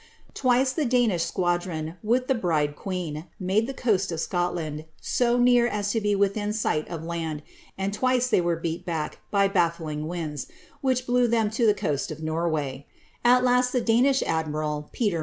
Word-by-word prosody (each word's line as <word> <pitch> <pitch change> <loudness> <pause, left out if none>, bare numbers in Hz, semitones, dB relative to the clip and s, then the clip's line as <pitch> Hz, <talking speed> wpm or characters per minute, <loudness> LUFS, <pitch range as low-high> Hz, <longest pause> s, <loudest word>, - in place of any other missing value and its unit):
Twice 255 0 +2
the 310 - 0
Danish 235 - +2
squadron, 175 -3 -2
with 245 +4 +1
the 265 - +3
bride 155 - 0
queen, 175 -4 -4
made 200 +4 +1
the 270 - -4
roa^i 200 -7 +1
w 165 - -3
Scotland, 165 -3 -2
so 240 -1 +1
near 245 -1 +5
as 205 -3 -1
to 225 - +1
he 205 -1 +1
within 200 +1 0
sight 180 -8 0
of 165 -2 -5
land, 165 -3 -4 0.3
and 195 +1 -2
twice 255 +2 +2
thi'V 185 - +2
were 170 0 +1
b<ci 165 0 -2
back 160 -4 -3
by 200 -1 +3
balHing 165 -5 -1
winds, 160 -4 -4 0.3
which 255 -2 +1
blew 245 0 +3
them 225 -2 +1
to 230 +1 +2
the 210 - +4
coast 145 -7 -2
of - - -5
Korwav. 155 -4 -2 0.4
A; 245 +1 +6
last 250 0 +3
the 250 - +3
Danish 245 +4 +3
admiral, 150 -1 -2
Peter 205 -8 0
190 Hz, 175 wpm, -26 LUFS, 160-240 Hz, 0.4 s, A